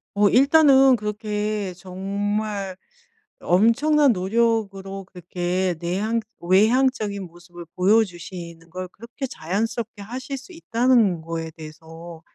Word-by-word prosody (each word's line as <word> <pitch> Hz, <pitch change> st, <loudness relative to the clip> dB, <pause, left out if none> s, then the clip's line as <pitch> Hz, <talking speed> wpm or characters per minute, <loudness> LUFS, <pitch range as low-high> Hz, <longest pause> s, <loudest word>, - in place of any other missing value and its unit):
어 205 Hz, 0 st, +4 dB
일단은 270 Hz, 0 st, +6 dB
그렇게 210 Hz, -1 st, -3 dB
정말 195 Hz, +2 st, -3 dB, 0.6 s
엄청난 270 Hz, -, +3 dB
노력으로 195 Hz, -1 st, -1 dB
그렇게 180 Hz, 0 st, -2 dB
내향 200 Hz, +7 st, -1 dB, 0.2 s
외향적인 210 Hz, +2 st, +2 dB
모습을 175 Hz, 0 st, -13 dB
보여주시는 180 Hz, -4 st, -1 dB
걸 185 Hz, +2 st, -6 dB
그렇게 235 Hz, +7 st, -7 dB
자연스럽게 215 Hz, +4 st, -3 dB
하실 255 Hz, +6 st, -6 dB
수 265 Hz, +8 st, -13 dB
있다는 235 Hz, -, +2 dB
거에 165 Hz, 0 st, -5 dB
대해서 160 Hz, +1 st, -11 dB
200 Hz, 260 characters per minute, -23 LUFS, 180-230 Hz, 0.6 s, 일단은